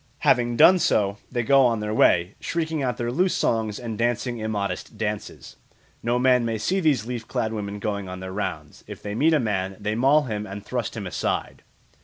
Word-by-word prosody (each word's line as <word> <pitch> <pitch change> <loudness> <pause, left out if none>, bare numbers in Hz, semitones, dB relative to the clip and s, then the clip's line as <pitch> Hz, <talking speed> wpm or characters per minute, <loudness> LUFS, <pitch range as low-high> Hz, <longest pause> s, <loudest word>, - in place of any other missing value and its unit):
Having 120 -1 +2
done 185 +7 +7
so 100 - +1
they 120 -2 -1
go 135 +2 +5
on 115 -3 +2
their 105 0 -3
way, 90 -3 +3
shrieking 160 -2 -2
out 125 -2 -1
their 120 0 -2
loose 180 +8 +1
songs 110 -2 0
and 115 -3 -6
dancing 120 0 -1
immodest 105 -1 -3
dances. 105 -1 -5 0.4
No 120 +1 0
man 125 -1 +4
may 115 -1 -1
see 185 - 0
these 145 - +2
leaf 120 -2 -5
clad 110 0 -2
women 105 -1 -4
going 100 -1 -3
their 95 0 -7
rounds. 105 +2 -5
If - - -9
they 105 - -4
meet 155 +8 +3
a - - +3
man, 95 -5 -2
they 105 +1 -2
maul 135 +6 +4
him 105 -5 -4
and 100 +1 -8
thrust - - -3
him - - -5
aside. - - -3
115 Hz, 200 wpm, -24 LUFS, 105-125 Hz, 0.4 s, done